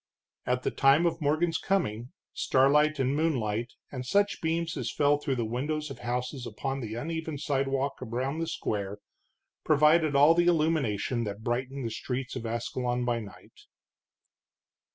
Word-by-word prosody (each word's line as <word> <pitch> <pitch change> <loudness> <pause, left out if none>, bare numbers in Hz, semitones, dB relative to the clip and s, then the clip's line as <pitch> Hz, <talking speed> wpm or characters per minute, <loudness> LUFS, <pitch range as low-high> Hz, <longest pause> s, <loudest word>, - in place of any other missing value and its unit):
At 125 0 0
the - - 0
time 140 +4 +4
of 165 -1 0
Morgan's 155 +3 +1
coming, 125 - -1 0.2
starlight 150 +3 +3
and 135 0 +1
moonlight, 120 -8 -1 0.2
and 130 -2 -5
such 200 +10 +1
beams 165 0 -1
as 130 -6 -3
fell 145 0 +2
through 145 -2 -1
the 120 -2 -1
windows 145 +6 -2
of - - -8
houses 125 +1 -3
upon 135 0 -3
the 110 -3 -5
uneven 160 +3 -4
sidewalk 135 -1 -1
around 130 +5 -2
the 165 - -2
square, 100 -9 -3 0.7
provided 155 0 +4
all 145 +4 +7
the 175 +1 +2
illumination 150 - +1
that 105 +1 -6
brightened 130 +3 -2
the 115 - -2
streets 125 +3 -4
of 120 -3 -4
Ascalon 120 +1 -2
by 120 -1 0
night. 105 -3 -12
135 Hz, 155 wpm, -28 LUFS, 120-155 Hz, 0.7 s, all